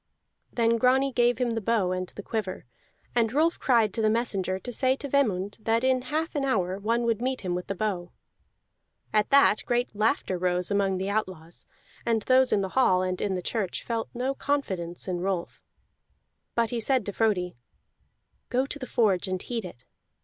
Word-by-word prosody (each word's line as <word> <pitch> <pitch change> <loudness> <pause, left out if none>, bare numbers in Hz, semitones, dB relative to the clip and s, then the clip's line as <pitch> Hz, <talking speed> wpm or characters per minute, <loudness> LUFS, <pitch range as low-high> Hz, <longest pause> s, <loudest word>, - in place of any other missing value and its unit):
Then 230 -1 +2
Grani 265 +2 +3
gave 240 -1 +3
him 245 -1 0
the 225 0 -2
bow 210 -4 +1
and 185 0 -2
the 205 - -10
quiver, 210 -5 -4 0.5
and 230 -2 +2
Rolf 320 +6 +2
cried 230 -6 +3
to 225 - -1
the 215 - +3
messenger 200 -5 0
to 245 +6 -7
say 260 +2 +2
to 285 - -6
Vemund 205 -9 0
that 225 +2 +1
in 260 -1 +3
half 310 +6 -2
an 290 -3 -1
hour 190 -8 0
one 230 +4 0
would 230 -1 0
meet 255 +1 -1
him 180 -2 -2
with 180 0 -4
the 200 - -3
bow. 185 -3 -2 1.0
At 215 -1 +2
that 280 -6 +5
great 245 -2 0
laughter 210 -3 0
rose 180 +1 0
among 195 -2 +1
the 190 +2 -2
outlaws, 185 -6 -4 0.4
and 225 -2 +1
those 260 0 +4
in 200 - +3
the 190 - -2
hall 185 -6 +3
and 185 0 -2
in 195 -2 0
the 180 - -4
church 205 -4 -2
felt 230 -1 -3
no 255 +3 -1
confidence 190 -14 -2
in 180 -2 -2
Rolf. 185 -2 -3 0.9
But 230 -1 +1
he 240 - -1
said 250 0 +1
to 205 - -4
Frodi, 190 -6 0 0.9
"Go 255 +2 +1
to 290 +1 -4
the 255 - -6
forge 205 -6 +2
and 185 0 -2
heat 230 +3 -4
it." 170 -9 -10
220 Hz, 195 wpm, -27 LUFS, 185-250 Hz, 1.0 s, that